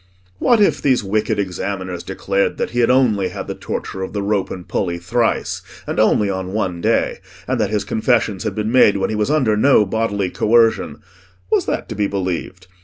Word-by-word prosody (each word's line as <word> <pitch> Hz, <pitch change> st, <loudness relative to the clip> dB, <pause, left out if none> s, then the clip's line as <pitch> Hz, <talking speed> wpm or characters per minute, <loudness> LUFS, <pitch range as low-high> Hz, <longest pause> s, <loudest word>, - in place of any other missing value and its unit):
What 240 Hz, -2 st, +4 dB
if 160 Hz, -9 st, +3 dB
these 130 Hz, -5 st, +2 dB
wicked 105 Hz, +2 st, 0 dB
examiners 95 Hz, -2 st, -3 dB
declared 100 Hz, +2 st, -1 dB
that -, -, -2 dB
he 120 Hz, -, -2 dB
had 120 Hz, -, +3 dB
only 120 Hz, -7 st, +3 dB
had -, -, -6 dB
the -, -, -4 dB
torture 95 Hz, -, -5 dB
of 95 Hz, -, -5 dB
the 100 Hz, -1 st, -2 dB
rope 100 Hz, -2 st, 0 dB
and 90 Hz, -2 st, -8 dB
pulley 85 Hz, -3 st, -1 dB
thrice, 115 Hz, +7 st, -1 dB, 0.2 s
and -, -, -3 dB
only 105 Hz, -, +3 dB
on 95 Hz, -1 st, -3 dB
one 90 Hz, -5 st, -2 dB
day, -, -, +1 dB, 0.3 s
and -, -, -1 dB
that -, -, +1 dB
his 105 Hz, -1 st, -1 dB
confessions 110 Hz, -3 st, 0 dB
had 105 Hz, -3 st, -3 dB
been 110 Hz, +1 st, -2 dB
made 110 Hz, -5 st, +5 dB
when 95 Hz, +2 st, -1 dB
he -, -, -1 dB
was 105 Hz, +2 st, 0 dB
under 135 Hz, -8 st, +2 dB
no 110 Hz, -1 st, +4 dB
bodily 100 Hz, -2 st, -1 dB
coercion—was 95 Hz, -5 st, 0 dB
that -, -, -2 dB
to -, -, -5 dB
be 105 Hz, 0 st, 0 dB
believed? 95 Hz, -1 st, -4 dB
100 Hz, 195 wpm, -19 LUFS, 95-115 Hz, 0.3 s, made